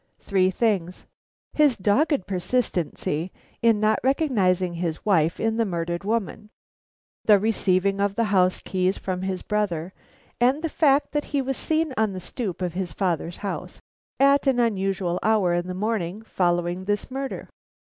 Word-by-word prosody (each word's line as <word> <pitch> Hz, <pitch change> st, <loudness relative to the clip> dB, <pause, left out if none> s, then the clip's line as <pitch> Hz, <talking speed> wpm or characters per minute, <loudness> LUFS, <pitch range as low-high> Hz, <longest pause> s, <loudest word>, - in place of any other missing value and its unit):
Three 190 Hz, -2 st, +2 dB
things: 190 Hz, -3 st, -1 dB, 0.5 s
his 295 Hz, -5 st, +3 dB
dogged 210 Hz, -, +2 dB
persistency 180 Hz, -5 st, -2 dB, 0.3 s
in 230 Hz, -2 st, +4 dB
not 215 Hz, 0 st, +2 dB
recognizing 200 Hz, -, +1 dB
his 170 Hz, -2 st, -4 dB
wife 170 Hz, -5 st, +2 dB
in 225 Hz, 0 st, 0 dB
the 230 Hz, -, +3 dB
murdered 170 Hz, -3 st, -3 dB
woman; 215 Hz, 0 st, -2 dB, 0.8 s
the 210 Hz, -2 st, +7 dB
receiving 200 Hz, -2 st, +1 dB
of 200 Hz, 0 st, 0 dB
the 230 Hz, -, +1 dB
house 185 Hz, -4 st, +2 dB
keys 185 Hz, 0 st, 0 dB
from 185 Hz, -1 st, -4 dB
his 190 Hz, -1 st, -3 dB
brother; 190 Hz, -4 st, -2 dB, 0.5 s
and 260 Hz, +6 st, +2 dB
the 325 Hz, -, 0 dB
fact 290 Hz, -2 st, +2 dB
that 295 Hz, 0 st, -1 dB
he 285 Hz, -, -1 dB
was 270 Hz, +1 st, -2 dB
seen 315 Hz, 0 st, -1 dB
on 220 Hz, -2 st, +1 dB
the 185 Hz, -, -5 dB
stoop 185 Hz, -1 st, -5 dB
of 175 Hz, -2 st, -2 dB
his 180 Hz, -2 st, -3 dB
father's 175 Hz, -1 st, -2 dB
house 200 Hz, -, -5 dB, 0.4 s
at 275 Hz, +1 st, +4 dB
an 260 Hz, -2 st, +3 dB
unusual 195 Hz, -5 st, 0 dB
hour 210 Hz, -5 st, +2 dB
in 175 Hz, +1 st, -1 dB
the 185 Hz, -, -4 dB
morning 210 Hz, -1 st, -2 dB
following 175 Hz, -2 st, -1 dB
this 205 Hz, +4 st, -2 dB
murder. 270 Hz, +1 st, -4 dB
200 Hz, 155 wpm, -24 LUFS, 180-230 Hz, 0.8 s, the